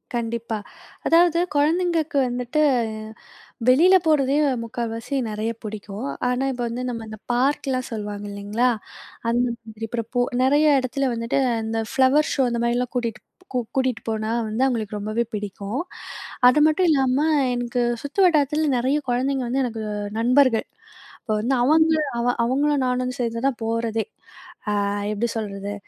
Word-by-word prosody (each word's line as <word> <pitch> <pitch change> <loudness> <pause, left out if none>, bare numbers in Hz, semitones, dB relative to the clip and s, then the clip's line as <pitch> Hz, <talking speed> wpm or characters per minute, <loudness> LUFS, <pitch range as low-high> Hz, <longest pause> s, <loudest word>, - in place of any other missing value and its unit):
கண்டிப்பா, 235 -1 -2 0.5
அதாவது 335 0 +4 0.2
கொழந்தைங்களுக்கு 325 0 +1
வந்துட்டு 250 +5 -1 1.1
வெளியில 340 +9 +6
போறதே 280 -3 +3 0.3
முக்கால்வாசி 230 +3 -4
நெறைய 215 +2 -2
பிடிக்கும். 215 +3 -6 0.2
ஆனா, 250 +2 0
இப்ப 245 - -6
வந்து 240 +2 -4
நம்ப 230 -2 -4
இந்த 215 -1 -9
பார்க்லாம் 260 0 0
சொல்வாங்க 205 -2 -5
இல்லங்களா, 205 +5 0 0.6
அந்த 240 +1 +2 0.3
மாரி 225 +1 -5
இப்ப 240 +2 -1 0.2
நெறைய 290 +3 +4
இடத்துல 260 +1 -1
வந்துட்டு, 230 +3 -1 0.3
இந்த 225 0 -1
ஃப்ளவர் 270 +3 +3
ஷோ 270 - +2
அந்த 235 0 -1
மாதிரிலாம் 245 +1 0
கூட்டிட் 235 -3 -2 0.5
கூட்டிட்டு 260 -3 0
போனா 220 0 -1 0.2
வந்து 220 +4 0
அவங்களுக்கு 220 -5 -1
ரொம்பவே 215 +3 -1
பிடிக்கும். 205 +3 -4 0.7
அது 255 +4 +5
மட்டும் 315 +4 +3
இல்லாம 270 -3 +3 0.4
எனக்கு 245 0 -1 0.2
சுத்து 285 +7 -5
வட்டாரத்துல 300 -2 +2
நெறைய 260 +5 +1
குழந்தைங்க 260 +2 0
வந்து 265 +3 0
எனக்கு 230 -3 -3 0.4
நண்பர்கள். 250 -1 +3 0.6
இப்ப 220 - -5
வந்து 260 +4 +1
அவங்க 315 +4 +4 0.5
அவங்களும் 280 +2 +1
நானும் 250 0 0
வந்து 255 +1 -5
சேர்ந்துதான் 235 +2 -1
போறதே. 225 -1 -1 0.7
அ - - +1 0.4
எப்படி 225 +3 -1
சொல்லுறது 200 -1 -4
245 Hz, 130 wpm, -23 LUFS, 225-275 Hz, 1.1 s, வெளியில